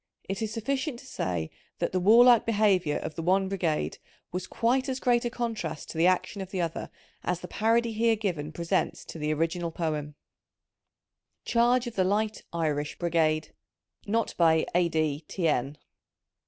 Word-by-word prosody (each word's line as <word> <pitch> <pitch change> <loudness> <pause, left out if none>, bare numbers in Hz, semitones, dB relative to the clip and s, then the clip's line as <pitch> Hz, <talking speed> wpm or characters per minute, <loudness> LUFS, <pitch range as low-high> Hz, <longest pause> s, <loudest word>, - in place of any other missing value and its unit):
It 195 +2 -3
is 220 -1 -2
sufficient 260 +4 -2
to - - -16
say 85 - -3 0.3
that - - -1
the 185 - 0
warUke 235 +4 +7
behaviour 200 -8 +2
of - - -5
the 165 - -5
one 190 +3 +2
brigade 175 -5 -1 0.3
was 180 +1 -4
quite 260 +4 +1
as 260 0 -2
great 240 -2 +2
a - - +1
contrast 225 -11 -4
to - - -8
the 170 - +5
action 185 +2 0
of 190 - -6
the 190 - -4
other, 165 -2 -3 0.3
as 180 0 -1
the 180 - -7
parody 230 +3 +1
here 225 +1 +3
given 175 -9 -3
presents 170 +1 -1
to 165 - -8
the 150 0 -1
original 165 +2 -1
poem: 155 -3 -3 0.6
— - - -58
Charge 240 +1 +3
of 240 - -5
the 190 - +3
Light 210 +3 0
(Irish) 150 -3 -1
Brigade. 160 -2 +1 0.5
{Net 225 +2 0
by 160 -1 +4
A—d 160 -3 +1
T 175 -4 -1
n). 140 0 0
180 Hz, 170 wpm, -28 LUFS, 160-225 Hz, 0.6 s, warUke